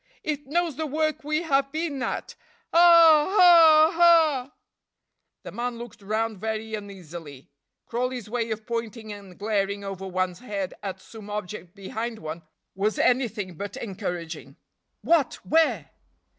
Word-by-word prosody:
It 295 -2 -4
knows 335 0 -1
the 315 -1 -2
work 310 +1 -1
we 305 +3 -1
have 275 -3 +1
been 310 -3 -3
at. - - -4 0.4
Ah! 335 -3 +7
ah! 330 -2 +7
ah!" 315 -6 +4 0.9
The - - -8
man 240 0 -4
looked 235 -2 -10
round 215 +1 -2
very 220 +1 -4
uneasily. 170 -9 -9 0.3
Crawley's 245 -1 -3
way 230 0 -2
of 220 0 -5
pointing 230 -2 -5
and 195 -3 -12
glaring 200 -1 -1
over 195 -1 -6
one's 185 -1 -2
head 200 -6 -4
at 190 -2 -5
some 210 +1 -12
object 205 -3 -6
behind 220 +4 -5
one 160 -2 -7 0.3
was 205 +3 -1
anything 225 -7 0
but 205 +2 -6
encouraging. 180 -6 -6 0.5
"What? 325 -6 +2
where?" 325 +1 +1
225 Hz, 135 wpm, -25 LUFS, 200-295 Hz, 0.9 s, Ah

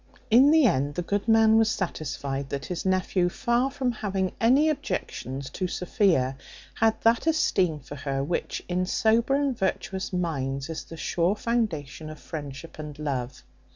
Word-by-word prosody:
In 255 +5 +7
the 315 -2 +5
end, 145 - +1
the 175 - -2
good 200 +4 -2
man 225 0 +5
was 220 -1 +3
satisfied 140 -8 -3
that 140 -2 -4
his 180 +1 -4
nephew, 185 -1 +1
far 240 +7 +1
from 265 -2 -1
having 195 -4 -2
any 265 +7 +5
objections 140 - -3
to 185 - -2
Sophia, 175 -8 +1 0.4
had 225 0 +2
that 230 +6 +3
esteem 185 - +2
for 145 +1 -10
her, 135 0 -2
which 170 +5 -3
in 180 0 -1
sober 230 +6 +2
and 280 -2 +1
virtuous 190 -2 -2
minds 140 -5 -2
is 160 - -5
the 165 - -10
sure 175 +4 0
foundation 210 - -2
of 155 - -8
friendship 145 +1 -8
and 150 -1 -7
love. 130 -4 -4
180 Hz, 160 wpm, -26 LUFS, 145-225 Hz, 0.4 s, In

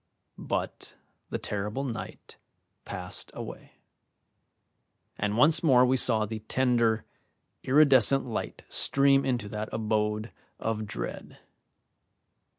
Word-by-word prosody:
But - - -4 0.3
the - - -2
terrible 105 +6 -4
night 120 -4 -7 0.5
passed 90 -2 -6
away, - - -9 1.4
and 105 +1 -2
once 150 +6 +8
more 130 -6 +5
we 130 +1 +2
saw 115 -4 +3
the 110 +1 -6
tender, 115 -1 +1 0.6
iridescent 135 -2 +4
light 120 - -5
stream 140 0 +2
into 120 -5 -1
that 105 +1 -5
abode 110 0 -1 0.3
of 110 -1 -3
dread. - - -7
115 Hz, 100 wpm, -28 LUFS, 105-130 Hz, 1.4 s, once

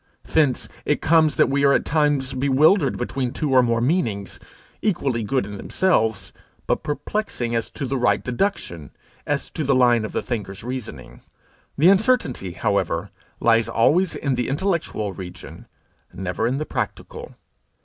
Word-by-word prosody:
Thence 145 -6 +1 0.2
it 150 - 0
comes 155 -2 +3
that - - +4
we 140 +1 0
are 140 0 +5
at - - +1
times 145 -3 +1
bewildered 140 +5 +3
between 125 0 -2
two 150 0 -2
or 130 -1 +6
more 115 -1 +1
meanings, 115 - -1 0.4
equally 140 - 0
good 130 +2 0
in 100 0 -7
themselves, 110 - 0 0.3
but - - 0
perplexing 145 - -3
as 115 -1 -1
to 140 - -5
the 135 0 -2
right 120 - +2
deduction, 120 - -2 0.4
as - - -2
to 155 - -3
the 135 -1 +2
line 120 -3 +4
of 110 - -4
the - - -2
thinker's 100 -5 -5
reasoning. 125 -1 -7 0.6
The 165 +6 +6
uncertainty, 190 - +2
however, 100 -5 -1 0.3
lies 115 -1 +3
always 170 +10 +2
in 140 -2 -1
the 125 -1 -1
intellectual 145 - -1
region, 90 -2 -10 0.4
never 95 +4 -2
in 130 +3 -1
the 155 - -3
practical. - - -5
130 Hz, 155 wpm, -22 LUFS, 115-150 Hz, 0.6 s, or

